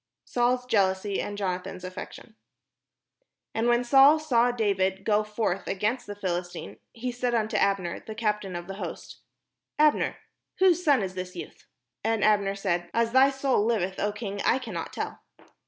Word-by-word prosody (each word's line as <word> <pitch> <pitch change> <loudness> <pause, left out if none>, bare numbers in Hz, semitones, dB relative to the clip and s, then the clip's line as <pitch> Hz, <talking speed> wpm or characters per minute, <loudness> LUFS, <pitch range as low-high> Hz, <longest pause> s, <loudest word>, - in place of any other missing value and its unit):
Saul's 250 +1 +1
jealousy 200 -3 +1
and 205 - -5
Jonathan's 185 -1 -3
affection 185 0 -9 1.2
And 225 +1 0
when 240 0 +3
Saul 275 +4 +7
saw 245 -6 +2
David 195 -5 0
go 210 0 +3
forth 210 -3 -2
against 215 +6 -1
the 205 - -6
Phil 185 -4 -1
istine, 115 - -10
he 250 +2 -4
said 245 0 -1
unto 220 -1 0
Abner, 195 -3 +1
the 220 - -9
captain 210 -4 -1
of 175 0 -5
the 195 +1 -7
host: - - -7 0.3
" - - -60
Abner, 295 - 0 0.4
whose 360 -2 +4
son 280 - +4
is 185 -1 -4
this 185 0 -6
youth?" 175 - -9 0.4
And 225 -1 +1
Abner 200 -2 +3
said: 175 -3 -1
"As 230 0 +2
thy 260 +2 +6
soul 270 -5 +1
Hveth, 190 -5 0
0 205 - 0
king, 205 -2 -5
I - - +3
cannot 220 -11 -5
tell." - - -5
210 Hz, 170 wpm, -27 LUFS, 190-240 Hz, 1.2 s, Saul